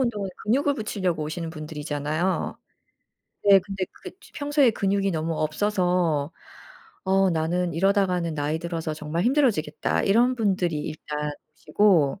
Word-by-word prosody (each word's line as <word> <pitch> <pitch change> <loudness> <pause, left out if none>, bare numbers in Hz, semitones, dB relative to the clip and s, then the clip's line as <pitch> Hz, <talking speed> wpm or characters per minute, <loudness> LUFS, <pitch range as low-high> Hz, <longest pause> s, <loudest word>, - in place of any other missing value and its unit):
운동은 210 -7 -1
근육을 280 +6 +2
붙이려고 185 - -2
오시는 165 +2 -4
분들이잖아요. 155 +2 -3 0.9
네. 200 -1 +8
근데 195 0 -4
그게 - - -11
쯔 - - -18
평소에 285 -4 +3
근육이 195 -1 0
너무 165 0 -2
없어서 175 -3 +1 0.7
"어. 190 0 +3
나는 170 +2 0
이러다가는 180 -3 +1
나이 150 +2 -1
들어서 165 -2 -4
정말 155 +4 -3
힘들어지겠다." 240 - +1
이런 240 +5 +3
분들이 185 -7 0
일단 150 -1 -4 0.2
오시고 170 -2 +2
180 Hz, 330 characters per minute, -25 LUFS, 155-200 Hz, 0.9 s, 네